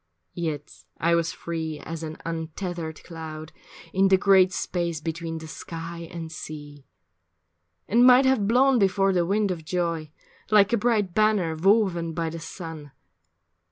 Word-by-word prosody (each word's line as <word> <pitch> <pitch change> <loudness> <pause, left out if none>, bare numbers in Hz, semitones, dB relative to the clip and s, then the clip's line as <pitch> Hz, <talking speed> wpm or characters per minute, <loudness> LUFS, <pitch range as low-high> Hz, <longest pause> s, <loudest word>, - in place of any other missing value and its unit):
Yet 155 -4 -5 0.2
I 170 +1 +2
was 165 -1 +1
free 160 -2 -4
as 165 +2 -7
an 160 -1 -6
untethered 165 0 -5
cloud 160 -2 -8 0.4
In 195 +1 +4
the 190 0 +5
great 190 -1 +5
space 170 -3 -2
between 165 +1 -4
the 160 - -8
sky 165 +1 -7
and 165 -2 -6
sea, 145 -3 -9 1.0
And 235 +4 +4
might 255 +1 +7
have 260 -7 +3
blown 255 +3 +4
before 195 -1 +3
the 175 -2 +1
wind 205 0 +1
of 165 -3 -5
joy 170 -2 -2 0.4
Like 210 0 +5
a - - +4
bright 210 -5 +1
banner 210 -6 +2
woven 175 -2 +2
by 165 -1 -2
the 165 - -6
sun. 160 -4 -8
170 Hz, 150 wpm, -25 LUFS, 160-195 Hz, 1.0 s, might